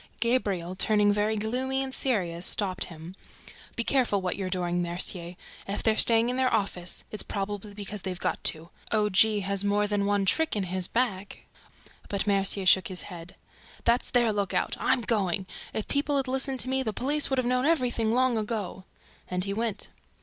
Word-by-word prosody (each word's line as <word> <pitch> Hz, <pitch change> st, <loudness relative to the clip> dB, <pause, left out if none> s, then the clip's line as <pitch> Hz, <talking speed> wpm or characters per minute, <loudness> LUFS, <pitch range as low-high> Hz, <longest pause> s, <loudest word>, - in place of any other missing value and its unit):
Gabriel, 200 Hz, -7 st, 0 dB
turning 205 Hz, +1 st, +3 dB
very 210 Hz, +1 st, +1 dB
gloomy 260 Hz, +5 st, -1 dB
and 265 Hz, -1 st, -6 dB
serious, 180 Hz, -12 st, 0 dB
stopped 185 Hz, -1 st, +2 dB
him. 165 Hz, +1 st, -10 dB, 0.6 s
"Be 235 Hz, -, 0 dB
careful 245 Hz, -6 st, +2 dB
what 185 Hz, -1 st, -2 dB
you're 190 Hz, -2 st, -3 dB
doing, 175 Hz, -1 st, -1 dB
Mercier! 175 Hz, 0 st, -3 dB, 0.3 s
If 200 Hz, -, -3 dB
they're 220 Hz, -1 st, +3 dB
staying 230 Hz, +1 st, +4 dB
in 250 Hz, -, -1 dB
their 260 Hz, -1 st, +2 dB
office, 180 Hz, -3 st, -2 dB
it's 215 Hz, -, -2 dB
probably 205 Hz, 0 st, -5 dB
because 205 Hz, 0 st, -6 dB
they 190 Hz, -, -4 dB
have 180 Hz, -, -2 dB
to! 165 Hz, +1 st, +4 dB, 0.2 s
O. 210 Hz, -1 st, +2 dB
G. 210 Hz, +1 st, +4 dB
has 200 Hz, 0 st, -1 dB
more 205 Hz, +1 st, +2 dB
than 205 Hz, -1 st, 0 dB
one 205 Hz, -1 st, +1 dB
trick 320 Hz, -, +2 dB
in 205 Hz, -, 0 dB
his 185 Hz, 0 st, -1 dB
bag!" 210 Hz, -5 st, -2 dB, 0.7 s
But 200 Hz, -1 st, -1 dB
Mercier 195 Hz, -1 st, +1 dB
shook 185 Hz, 0 st, +5 dB
his 185 Hz, -2 st, -5 dB
head. 170 Hz, +1 st, -10 dB, 0.5 s
"That's 235 Hz, +1 st, +2 dB
their 240 Hz, -3 st, +2 dB
lookout! 200 Hz, -2 st, -1 dB
I'm 260 Hz, -, +2 dB
going! 195 Hz, -4 st, 0 dB, 0.3 s
If 220 Hz, -, -4 dB
people 285 Hz, 0 st, 0 dB
had 270 Hz, -1 st, -1 dB
listened 265 Hz, 0 st, 0 dB
to 255 Hz, -, -2 dB
me, 265 Hz, 0 st, +1 dB
the 220 Hz, -5 st, -2 dB
police 290 Hz, +7 st, 0 dB
would 270 Hz, -, 0 dB
have 255 Hz, -, +1 dB
known 250 Hz, +3 st, +1 dB
everything 245 Hz, -8 st, +1 dB
long 250 Hz, -1 st, +2 dB
ago!" 210 Hz, -4 st, -4 dB, 0.4 s
And 180 Hz, 0 st, -1 dB
he 200 Hz, +1 st, -2 dB
went. 225 Hz, 0 st, -3 dB
205 Hz, 185 wpm, -27 LUFS, 190-245 Hz, 0.7 s, shook